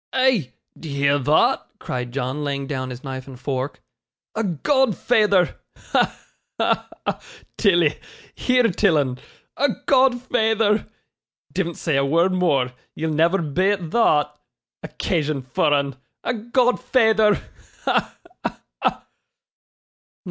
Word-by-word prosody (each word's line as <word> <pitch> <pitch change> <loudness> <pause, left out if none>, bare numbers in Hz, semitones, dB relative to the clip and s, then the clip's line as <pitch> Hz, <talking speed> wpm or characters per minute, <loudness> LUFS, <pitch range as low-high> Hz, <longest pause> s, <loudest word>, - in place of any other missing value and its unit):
'Eh! 260 - +3 0.3
d'ye 145 -4 -6
hear 140 +1 +3
thot?' 150 +4 +2
cried 125 -1 -4
John, 135 +3 -3
laying 140 -1 -2
down 130 -2 -3
his 125 0 -8
knife 130 -1 -6
and 130 -2 -11
fork. 130 +1 -4 0.5
'A 225 - -1
godfeyther! 210 - +2 0.2
Ha! - - 0 0.4
ha! - - +1 0.2
ha! - - -1 0.4
Tilly 175 -8 +3 0.3
hear 250 -1 +2
till 175 -2 +3
'un 130 -3 -1 0.4
a 285 - +3 0.2
godfeyther! 240 -5 +2 0.7
Divn't 170 -3 -2
say 155 -5 0
a 140 - +3
word 170 +6 +2
more, 145 -9 +2 0.2
ye'll 160 0 -2
never 170 +4 +2
beat 180 +3 0
thot. 150 -10 +2 0.4
Occasion 150 -4 -2
for 130 +4 +1
'un 140 -2 +1 0.3
a 240 - 0
godfeyther! 235 -2 +2 0.5
Ha! - - 0 0.3
ha! - - -4 0.2
ha! - - -1
165 Hz, 120 wpm, -22 LUFS, 140-220 Hz, 0.7 s, Eh